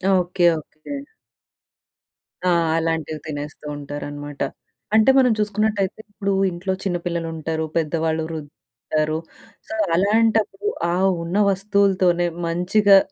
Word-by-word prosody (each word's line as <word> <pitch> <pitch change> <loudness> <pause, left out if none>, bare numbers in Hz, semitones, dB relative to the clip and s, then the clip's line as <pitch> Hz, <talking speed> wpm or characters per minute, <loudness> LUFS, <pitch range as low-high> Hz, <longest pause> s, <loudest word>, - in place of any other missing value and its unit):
Okay, 180 0 +1
okay. 155 - -9 1.5
ఆ! - - +5 0.3
అలాంటివి 160 -1 -1
తినేస్తూ 150 0 -6
ఉంటారనమాట. 145 0 -7 0.5
అంటే 220 +3 +6
మనం 255 -3 +5
చూసుకున్నట్టయితే 210 -1 0
ఇప్పుడు 200 -1 -1 0.2
ఇంట్లో 180 +2 -2
చిన్న 180 -3 0
పిల్లలు 170 -1 -2
ఉంటారు, 160 0 -2
పెద్దవాళ్ళు, 160 0 0
వృద్ధులు 155 -3 -5 0.4
ఉంటారు. 155 0 0 0.5
సో, - - -6 0.2
అలాంటప్పుడు 220 - +2 0.3
ఆ - - +1 0.3
ఉన్న 175 +4 -2
వస్తువులతోనే 190 -3 +2 0.2
మంచిగా 195 +4 +5
175 Hz, 105 wpm, -22 LUFS, 160-200 Hz, 1.5 s, అంటే